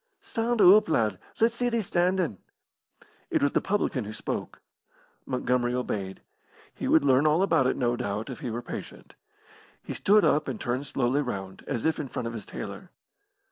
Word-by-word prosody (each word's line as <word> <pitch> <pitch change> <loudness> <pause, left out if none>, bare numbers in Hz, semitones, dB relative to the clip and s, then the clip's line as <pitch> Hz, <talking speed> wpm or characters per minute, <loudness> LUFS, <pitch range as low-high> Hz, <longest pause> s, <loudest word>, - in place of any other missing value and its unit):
"Stand 230 0 -1
oop, 205 +1 +7
lad; 110 - +1 0.2
let's 230 +1 +3
see 245 0 +1
thee 230 -2 0
standin'." 175 - 0 0.9
It - - +1
was 140 - +3
the - - +1
publican 170 - -1
who 105 - -6
spoke. - - -5 0.7
Montgomery 125 -1 0
obeyed. 100 -6 -3 0.5
He - - -4
would 160 -3 +4
learn 135 +2 +4
all 155 +5 +3
about 130 -9 +3
it, - - 0
no 120 -1 +1
doubt, 110 -3 -3
if 125 - -8
he 125 - -4
were 120 +2 -4
patient. - - -8 0.7
He - - -5
stood 210 +1 +4
up 150 +1 +2
and 130 - -4
turned 125 +4 -2
slowly 135 +1 +1
round, 95 -8 -5
as 125 -6 -2
if 160 - +1
in 150 - -3
front 120 -1 -4
of 115 - -5
his 110 -4 -7
tailor. - - -7
130 Hz, 180 wpm, -27 LUFS, 120-175 Hz, 0.9 s, oop